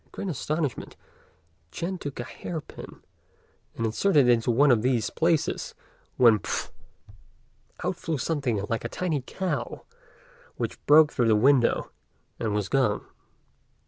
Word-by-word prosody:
In - - -32
great 195 - -5
astonishment 150 -2 -3 0.8
Ch'ên 180 - -4
took 145 -6 -6
a - - -2
hair 160 +6 -6
pin, - - -12 0.7
and 115 - -2
inserted 140 - +3
it - - +6
into 120 0 +1
one 135 +4 +5
of 115 -3 +3
these 120 -3 0
places, 165 -1 0 0.4
when 115 -4 +6
pff! - - -4 1.1
out - - -1
flew 160 -2 -3
something 125 -8 -1
like 115 - -2
a - - -4
tiny 165 -6 -2
cow, 185 +8 -4 0.7
which - - -5
broke 150 0 +6
through 120 -3 +1
the 110 - +4
window, 125 +2 +3 0.5
and 105 -2 -1
was 105 -2 -1
gone. 130 -5 +1
130 Hz, 145 wpm, -26 LUFS, 115-155 Hz, 1.1 s, it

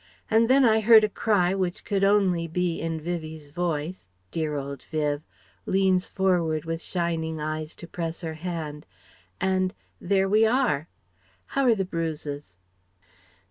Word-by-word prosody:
And 225 +1 +4
then 265 0 +6
I 220 -1 +5
heard 220 0 +7
a 215 - +2
cry 195 -4 +2
which 185 -2 -2
could 195 -1 0
only 195 -4 +3
be 170 0 -1
in 165 0 -2
Vivie's 160 -2 -5
voice 165 - -3 0.2
dear 155 -2 -1
old 140 -1 -5
Viv 150 -2 0 0.5
(leans 190 -1 +2
forward 170 -5 +1
with 165 0 -3
shining 165 -3 -2
eyes 155 +1 -4
to - - -10
press 165 -1 -4
her 160 -2 -4
hand) 155 -3 -5 0.5
and... 185 -1 +1 0.2
there 195 +1 +2
we 215 +3 +4
are. 225 - +2 0.7
How're 260 -4 +4
the 195 -2 -1
bruises?" 150 - -4
175 Hz, 140 wpm, -26 LUFS, 155-195 Hz, 0.7 s, heard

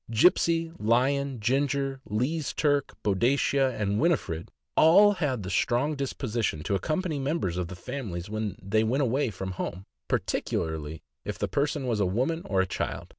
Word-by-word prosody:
Gipsey, 165 +6 +3
Lion, 130 +4 +1
Ginger, 135 +3 0
Lee's 130 +9 -1
Turk, 145 -2 +1
Boadicea, 130 +5 +2
and 100 0 0
Winifred 130 - 0 0.3
all 200 +6 +7
had 145 - -1
the 95 - -4
strong 125 - +1
disposition 120 - -2
to 100 - -1
accompany 155 - -1
members 135 - -1
of 90 -1 -2
the 95 - -8
families 90 -3 -5
when 110 -2 -3
they 110 +2 +1
went 130 +6 +1
away 130 +1 +1
from 95 -2 -5
home, 95 0 -5 0.2
particularly 80 -1 -2 0.2
if - - -4
the - - -1
person 145 -1 -1
was 115 -4 0
a 100 - +2
woman 130 - 0
or 95 -2 +2
a - - +1
child. 90 - -4
125 Hz, 160 wpm, -27 LUFS, 100-140 Hz, 0.3 s, all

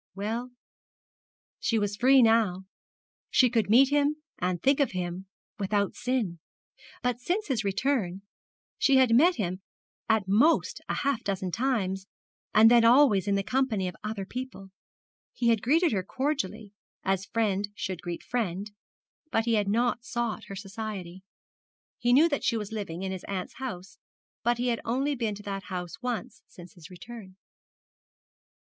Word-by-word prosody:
Well, 225 +5 -3 1.1
she 230 - +1
was 205 -1 -1
free 260 +3 +5
now. 220 -5 +3 0.7
She 250 -4 +4
could 225 -5 +1
meet 255 +5 +6
him 290 +1 +2 0.2
and 180 0 -1
think 275 - +3
of 280 - +1
him 180 +1 -4 0.3
without 200 0 0
sin; 240 -9 -2 0.6
but 245 -1 0
since 365 - -1
his 245 -5 0
return 195 -3 -1 0.6
she 275 - +4
had 260 -3 +5
met 340 +8 +5
him 185 -3 -3 0.5
at 220 -3 +2
most 235 +12 +3
half 280 -4 0
a - - -29
dozen 190 -2 -2
times, 195 -6 -1 0.4
and 220 +2 +7
then 240 -1 +6
always 230 -5 +5
in 200 - +2
the 195 - 0
company 240 -6 0
of 180 - -6
other 210 -2 -4
people. 245 -4 -7 0.6
He 235 - +1
had 225 -3 +3
greeted 320 - +3
her 200 -4 0
cordially, 220 -3 -3 0.3
as 195 0 0
friend 205 -3 0
should 185 -4 -4
greet 175 -1 -5
friend, 205 -4 -3 0.6
but 225 -6 +1
he 235 - +1
had 210 -2 +2
not 235 +3 +1
sought 240 -2 -3
her 195 - -8
society. 195 -2 -6 0.8
He 240 0 +2
knew 290 +7 +6
that 285 -4 -2
she 230 - +1
was 210 -1 -5
living 195 -5 -5
in 190 - -2
his 190 -1 -6
aunt's 190 -2 -5
house, 195 -8 -7 0.4
but 240 0 +1
he 245 +1 0
had 235 - -1
only 270 +5 0
been 230 -5 -2
to 210 - -11
that 195 -1 -5
house 180 +3 -6
once 245 -6 -4
since 175 -1 -14
his 170 -2 -14
return. 190 +1 -11
220 Hz, 160 wpm, -28 LUFS, 190-250 Hz, 1.1 s, and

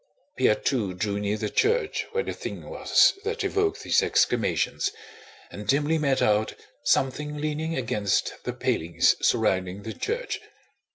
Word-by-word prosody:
Pierre 105 - +3
too 105 -9 -1
drew 100 +2 -2
near 105 +1 -1
the 105 0 -2
church 445 0 +1
where 470 +1 0
the - - -4
thing - - -7
was - - +4
that 445 +1 -2
evoked 405 +1 0
these - - +3
exclamations, 400 - +1 0.6
and 105 0 -8
dimly 150 +6 +2
made 140 -3 +1
out 105 +1 +2 0.3
something 150 +3 +1
leaning 155 +2 -2
against 105 -6 0
the - - -3
palings 85 +1 +2
surrounding 95 +1 +1
the 110 - -5
church. 480 +4 -3
135 Hz, 145 wpm, -26 LUFS, -, 0.6 s, was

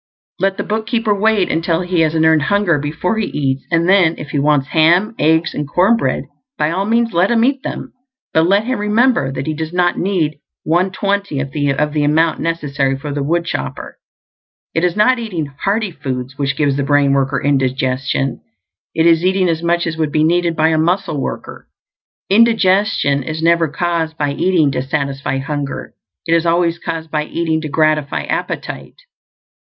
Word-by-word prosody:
Let 195 0 0
the - - -2
bookkeeper 220 0 -1
wait 205 -1 +1
until 165 +1 0
he 180 -1 -1
has 160 0 +2
an 160 0 +2
earned 160 -1 +4
hunger 195 -2 +1
before 160 +9 -2
he 215 - -1
eats; 135 -2 -2
and 165 0 +2
then, 185 -4 +4
if 150 - -8
he 145 - 0
wants 145 -2 +1
ham, 170 +7 +3
eggs, 160 +2 +2
and 145 -1 -4
corn 185 +9 +3
bread, 230 - -1 0.3
by 150 +1 0
all 190 +3 -1
means 230 +1 +1
let 175 +3 +2
him 235 -1 +3
eat 270 0 0
them; - - -6 0.4
but 160 +1 +3
let 200 +3 +3
him 255 +1 -2
remember 215 - +2
that 135 0 -4
he 155 - -2
does 160 +1 -5
not 175 0 +1
need 165 -6 -1 0.2
one 175 +4 +1
twentieth 200 -8 -2 0.3
of 150 0 0
the 150 -1 +1
amount 155 +2 +2
necessary 145 -5 -1
for 145 +1 -6
the 145 - -2
woodchopper. 155 - -3 0.7
It 165 - 0
is 180 -1 +1
not 240 +4 +3
eating 185 -9 -3 0.2
"hearty" 205 0 0
foods 130 -3 -5
which 140 0 -2
gives 140 -2 +1
the 140 - 0
brain 140 -1 +3
worker 135 0 +1
indigestion; 130 -1 -1 0.5
it 160 - +2
is 165 0 +4
eating 185 0 +2
as 165 -1 -1
much 170 0 +1
as 160 -1 -3
would 155 -2 -1
be 155 +1 +2
needed 170 +1 +1
by 160 0 +3
a 160 -1 +1
muscle 175 -2 0
worker. - - -6 0.6
Indigestion 200 -8 +3
is 155 +4 -5
never 170 0 +3
caused 165 0 -2
by 145 -1 -1
eating 165 -3 +2
to - - -2
satisfy 135 0 -2
hunger; 140 0 -4 0.3
it 165 - +1
is 165 0 +2
always 170 0 +1
caused 160 -2 -5
by 150 -1 -1
eating 160 -1 -1
to 155 - -5
gratify 155 -1 +1
appetite. - - -4
165 Hz, 185 wpm, -17 LUFS, 145-185 Hz, 0.7 s, earned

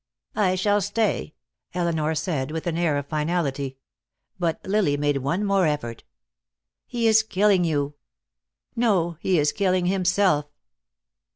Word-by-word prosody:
"I 195 -3 +2
shall 205 +2 +2
stay," 205 -5 -1 0.4
Elinor 160 -3 0
said, 150 -4 -2
with 160 +1 -4
an 170 -2 -1
air 165 -4 +1
of 145 - -3
finality. 145 -3 -2 0.6
But 170 -2 0
Lily 190 -7 +1
made 145 -1 +1
one 165 +10 -1
more 195 -3 +3
effort. 130 -7 -3 0.8
"He 240 -2 -2
is 220 0 +6
killing 205 -3 +2
you." 145 -3 0 0.8
"No, 185 -8 +1
he 185 0 +1
is 150 -1 +2
killing 185 -2 +1
himself." 180 -4 +2
175 Hz, 130 wpm, -24 LUFS, 150-195 Hz, 0.8 s, is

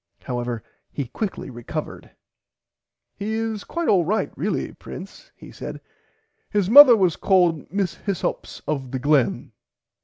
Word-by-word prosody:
However 120 -2 -3 0.3
he 140 - -3
quickly 195 - -4
recovered. 120 -1 -6 1.0
He 210 +2 -4
is 225 -2 -3
quite 340 -1 -3
alright 195 +2 +1
really - - -2
Prince - - -11
he - - -13
said - - -7 0.7
His 205 -2 0
mother 275 -2 +11
was 185 -5 +2
called 175 -7 +2
Miss 195 -3 -1
Hyssops 200 -4 -4
of 140 -4 -2
the 130 - -3
Glen. 140 -1 +1
185 Hz, 125 wpm, -23 LUFS, 140-210 Hz, 1.0 s, mother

